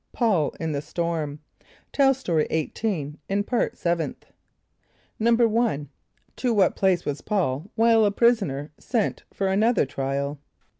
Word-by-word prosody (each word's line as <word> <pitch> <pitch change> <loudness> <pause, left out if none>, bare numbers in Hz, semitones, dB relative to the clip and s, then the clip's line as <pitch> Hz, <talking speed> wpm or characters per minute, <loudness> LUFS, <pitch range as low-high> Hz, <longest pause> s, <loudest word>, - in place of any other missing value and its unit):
Paul 200 - +1
in 160 -1 -2
the 140 -1 -2
Storm. 160 -3 -3 0.5
(Tell 270 -1 +4
Story 170 - 0
18 160 -2 -2
in 200 +1 +1
Part 240 +1 -1
Seventh.) 170 -5 -2 1.0
=1.= 230 -8 +2 0.5
To 245 -2 0
what 200 - +3
place 185 -3 +2
was 145 0 -3
P[a:]ul 180 -5 -1
while 225 0 +5
a 205 - +4
prisoner 195 - +1
sent 230 -5 -1
for 195 - -1
another 215 +3 +3
trial? 140 +1 -3
190 Hz, 130 wpm, -25 LUFS, 150-225 Hz, 1.0 s, while